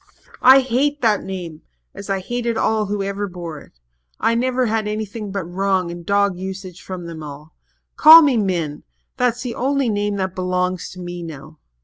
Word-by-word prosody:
"I 265 +2 +8
hate 270 +4 0
the 215 -2 +4
name 180 -5 -7 0.3
as 200 - -10
I 195 -1 -1
hated 235 +2 -2
all 215 -1 +1
who 205 0 -2
ever 200 +1 -3
bore 170 -4 -7
it. - - -19 0.4
I 230 - +2
never 255 +2 +1
had 220 -1 -1
anything 210 0 -4
but 195 -1 -3
wrong 185 0 -1
and 175 0 -8
dog 200 0 +1
usage 190 -1 -7
from 185 -2 -7
them 165 -2 -8
all. 150 +1 -10 0.4
Call 320 +2 +10
me 280 -4 +3
Min 175 -8 -1 0.4
that's 245 0 0
the 245 -2 -4
only 275 -1 0
name 205 -1 -1
that 190 -2 -2
belongs 180 0 -2
to 185 - -11
me 175 0 -6
now. 155 -1 -10
195 Hz, 180 wpm, -20 LUFS, 180-230 Hz, 0.4 s, Call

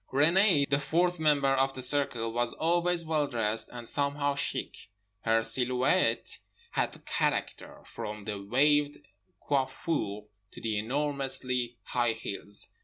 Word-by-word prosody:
Renée, 155 +2 +4
the 140 +1 +1
fourth 175 +4 0
member 145 -3 +3
of 135 0 +1
the 130 - -2
circle, 125 -4 +1
was 120 +1 0
always 175 +1 +1
well 155 -2 0
dressed 110 -3 -1
and 120 -1 -7
somehow 145 +1 +2
chic. 140 - -4 0.4
Her 115 0 +3
silhouette 125 +3 +1 0.3
had - - -2
character, - - -2
from 105 -1 -6
the 105 -2 -4
waved 145 +6 +2 0.5
coiffure 130 -6 -1 0.3
to - - -10
the 110 -2 -1
enormously 130 -1 -1
high 120 0 0
heels. 100 -2 -6
135 Hz, 125 wpm, -29 LUFS, 115-145 Hz, 0.5 s, Renée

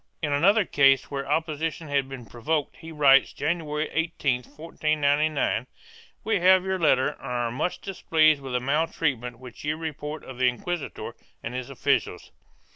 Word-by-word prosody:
In 145 -2 0
another 195 +8 +4
case 135 -4 +3
where 140 0 -4
opposition 160 +1 -2
had 140 -2 0
been 130 -3 -8
provoked 145 +6 -2
he 165 0 -10
writes, 140 -3 +5
January 155 -2 -2
18, 160 -5 0
1499, 150 +1 0 0.6
"We 220 -3 +1
have 185 +1 +5
your 190 0 -1
letter 135 -5 +3
and - - -12
are 120 -3 -2
much 150 +9 -2
displeased 155 -6 +2
with 135 -2 -6
the 125 - +2
maltreatment 135 -3 -1
which 125 -1 -12
you 150 +1 -1
report 155 -1 -6
of 130 -1 -10
the 125 -1 +4
inquisitor 165 +5 -5 0.3
and 115 - -5
his 125 +1 -5
officials. 135 - -1
150 Hz, 155 wpm, -26 LUFS, 135-160 Hz, 0.6 s, writes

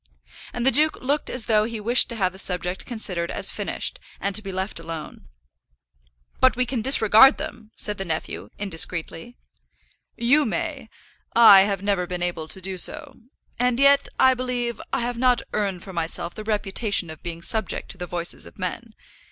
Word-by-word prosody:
And 240 0 -4
the 265 - +6
duke 310 +3 +1
looked 285 +3 -1
as 250 -3 0
though 215 -2 +3
he 230 -1 -5
wished 235 +4 +3
to 235 - -6
have 190 -4 0
the 190 - -1
subject 180 -1 +1
considered 185 -8 -2
as - - +2
finished, - - -3 0.2
and 200 0 -2
to 215 - +2
be 195 -2 -7
left 190 0 -3
alone. 165 - -9 1.1
"But 260 - +4
we 250 +1 0
can 245 -2 -3
disregard 225 +1 +6
them," 220 -2 -8
said 210 -1 -3
the - - -2
nephew, 160 -2 -4
indiscreetly. 180 +2 -2 0.8
"You 255 +6 +3
may. 280 -2 -4 0.5
I 220 -4 +9
have 195 -1 -3
never 195 -3 0
been 180 0 -4
able 175 -3 -3
to 190 - -4
do 185 0 -6
so. 285 - 0 0.5
And 250 0 +1
yet, 280 0 +4
I 260 - +6
believe, 245 -2 -3
I 270 - 0
have 240 0 -3
not 250 -2 +2
earned 195 -4 -2
for 190 - -10
myself 170 +1 -2
the 215 - -8
reputation 205 -3 -2
of 160 - -12
being 170 -1 -7
subject 220 +3 -1
to - - -3
the 180 - -5
voices 170 0 -2
of - - -17
men. 215 +5 -5
215 Hz, 185 wpm, -23 LUFS, 180-245 Hz, 1.1 s, I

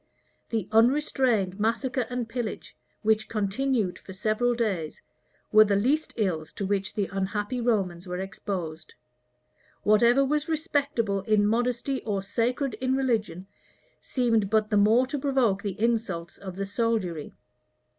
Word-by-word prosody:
The 220 -5 -2
unrestrained 230 -5 +2
massacre 235 +3 0
and 245 -2 -3
pillage, 230 -2 -5 0.3
which 220 0 +2
continued 215 -1 0
for 190 - -11
several 215 +5 +1
days, 195 -10 -2 0.5
were 215 0 +8
the 205 -1 +1
least 275 +10 +1
ills 165 -7 -1
to 200 - -4
which 195 0 -1
the 205 - +1
unhappy 205 +5 -2
Romans 190 -7 0
were 180 0 -3
exposed.[*] 180 -5 -5 0.9
Whatever 235 +6 +5
was 300 +3 -1
respectable 280 -10 0
in 210 -1 +3
modesty 245 +4 0
or 200 -3 -2
sacred 245 +6 -1
in 260 0 +1
religion, 220 -9 -1 0.6
seemed 230 -6 +1
but 215 0 +1
the - - +2
more 215 +5 +5
to 275 +2 -4
provoke 260 -8 +1
the 200 0 -4
insults 215 -7 -1
of 190 -2 -7
the 195 +1 -3
soldiery. 200 -7 -2
220 Hz, 135 wpm, -27 LUFS, 195-245 Hz, 0.9 s, were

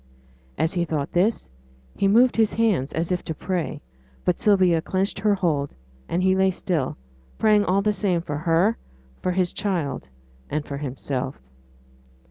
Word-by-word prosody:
As 160 - +1
he 175 -2 +1
thought 155 -4 -2
this, 185 - +1 0.4
he 200 - +2
moved 240 +5 +5
his 220 -2 +2
hands 205 - +1
as 165 +2 -2
if 180 - 0
to 160 - -4
pray; 180 +1 -3 0.4
but 180 - +1
Sylvia 185 -5 +4
clenched 190 +3 -1
her 210 -1 +3
hold, 155 -7 -1 0.3
and 175 +2 0
he 190 0 +4
lay 190 0 +3
still, 175 -6 -2 0.4
praying 210 -1 +4
all 195 +2 +2
the 210 0 +2
same 185 -4 0
for 145 -3 -4
her, 170 +7 +2 0.4
for 185 - 0
his 180 -1 0
child, 170 - -2 0.4
and 150 +1 -2
for 140 - -5
himself. 135 -1 -4
180 Hz, 160 wpm, -24 LUFS, 160-200 Hz, 0.4 s, moved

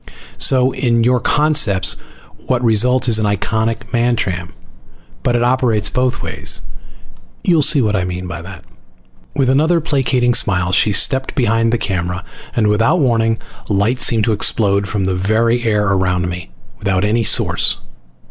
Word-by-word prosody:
So, 130 0 +3
in 115 -3 0
your 125 +1 +2
concepts, 145 -13 +2 0.5
what 125 -1 0
results 125 +3 +3
is 110 -2 +3
an 110 - 0
iconic 110 +3 -2
Mantram. 115 -8 -1 0.7
But 120 - 0
it 120 - +1
operates 120 -4 +1
both 130 0 -1
ways. - - 0 0.8
You'll 170 -4 +3
see 145 -2 +4
what 105 -1 0
I 95 - 0
mean 90 0 -5
by 85 -1 -6
that." 95 +2 -11 0.7
With 135 -2 +1
another 155 +6 +2
placating 130 -5 0
smile 90 -7 +1
she 105 - +2
stepped 130 +6 +1
behind 115 -2 +1
the 120 - +1
camera 90 -3 -3 0.3
and 115 - +1
without 115 +11 +2
warning 115 -5 +1 0.3
light 105 +5 0
seemed 110 -2 +2
to 110 - +1
explode 100 -1 +1
from 100 -3 -2
the 95 0 -1
very 110 +6 +1
air 105 -2 +1
around 90 -2 0
me, 90 -7 -7 0.3
without 100 -2 -1
any 110 +3 +1
source. - - +2
115 Hz, 155 wpm, -16 LUFS, 100-125 Hz, 0.8 s, see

